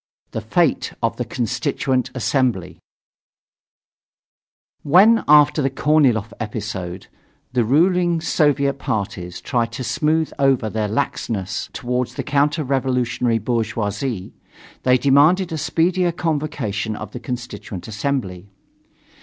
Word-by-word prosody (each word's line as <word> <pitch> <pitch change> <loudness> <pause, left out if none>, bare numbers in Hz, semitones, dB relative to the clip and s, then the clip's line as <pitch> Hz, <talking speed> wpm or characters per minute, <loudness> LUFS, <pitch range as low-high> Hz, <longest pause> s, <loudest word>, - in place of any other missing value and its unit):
THE - - -4
FATE - - +1
OF - - 0
THE - - -2
CONSTITUENT 125 +2 -1
ASSEMBLY 120 -7 0 2.0
When, 200 +10 +5
after 150 +1 +6
the 135 - +1
Korniloff 135 -6 +2
episode, 100 -5 -5 0.5
the 125 -2 +2
ruling 170 - +3
Soviet 140 -4 +1
parties 90 -7 -3
tried 120 -3 -1
to 130 - -4
smooth 155 +5 0
over 135 -6 +2
their 110 -1 -1
laxness 110 -5 -2
toward 125 0 -2
the - - -6
counter 145 +2 +1
revolutionary 125 -3 0
bourgeoisie, 110 -1 -2 0.5
they 125 0 +4
demanded 150 +8 +4
a 160 - -2
speedier 175 +4 +1
convocation 145 - -2
of 110 -1 -7
the 125 - -7
Constituent 120 -7 -6
Assembly. 105 -5 -3
125 Hz, 110 wpm, -21 LUFS, 110-150 Hz, 2.0 s, after